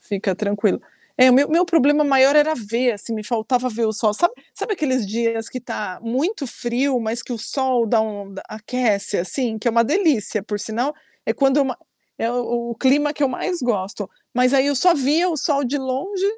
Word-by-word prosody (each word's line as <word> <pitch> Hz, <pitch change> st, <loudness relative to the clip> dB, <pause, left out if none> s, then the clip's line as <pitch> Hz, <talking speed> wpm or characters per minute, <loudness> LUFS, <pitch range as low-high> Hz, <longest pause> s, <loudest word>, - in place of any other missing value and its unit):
fica 195 Hz, -2 st, -2 dB
tranquilo. 205 Hz, +1 st, 0 dB, 0.4 s
É 255 Hz, 0 st, +7 dB
o -, -, +6 dB
meu 280 Hz, +3 st, +5 dB
o -, -, -8 dB
meu 340 Hz, +3 st, +4 dB
problema 300 Hz, -3 st, +3 dB
maior 275 Hz, 0 st, +5 dB
era 305 Hz, +1 st, +4 dB
ver 235 Hz, +1 st, 0 dB
assim, 220 Hz, +2 st, -4 dB
me 215 Hz, -, -4 dB
faltava 245 Hz, +2 st, 0 dB
ver 230 Hz, -1 st, -1 dB
o 220 Hz, -, 0 dB
sol. 215 Hz, 0 st, +1 dB
Sabe 345 Hz, -, +2 dB, 0.2 s
sabe 435 Hz, -, -3 dB
aqueles 260 Hz, -, -1 dB
dias 230 Hz, +1 st, -1 dB
que 255 Hz, -, -6 dB
tá 210 Hz, -6 st, -5 dB
muito 275 Hz, -, -2 dB
frio, 245 Hz, +3 st, -1 dB
mas 225 Hz, +1 st, -2 dB
que -, -, -7 dB
o 235 Hz, -, -4 dB
sol 255 Hz, 0 st, 0 dB
dá 225 Hz, 0 st, +2 dB
um 205 Hz, -2 st, -5 dB
da -, -, -8 dB
aquece 215 Hz, -2 st, 0 dB
assim, 220 Hz, +5 st, -1 dB
que 225 Hz, -, -1 dB
é -, -, +3 dB
uma 230 Hz, +1 st, +3 dB
delícia 285 Hz, -, +1 dB
por 210 Hz, -1 st, -4 dB
sinal. 245 Hz, +7 st, -2 dB, 0.3 s
É -, -, +2 dB
quando 275 Hz, +1 st, +2 dB
ma 255 Hz, -2 st, -3 dB, 0.4 s
é 230 Hz, -, -1 dB
o 235 Hz, -1 st, -2 dB
clima 290 Hz, +4 st, +2 dB
que 295 Hz, -, -4 dB
eu -, -, +2 dB
mais 345 Hz, +7 st, -3 dB
gosto. 205 Hz, -4 st, -2 dB, 0.2 s
Mas 250 Hz, +2 st, +2 dB
aí 270 Hz, 0 st, +4 dB
eu 285 Hz, -, +1 dB
só 350 Hz, +6 st, +4 dB
via 300 Hz, +6 st, +2 dB
o 335 Hz, -, -1 dB
sol 285 Hz, -1 st, 0 dB
de 270 Hz, +4 st, -1 dB
longe 275 Hz, +10 st, -3 dB
250 Hz, 215 wpm, -21 LUFS, 225-280 Hz, 0.4 s, É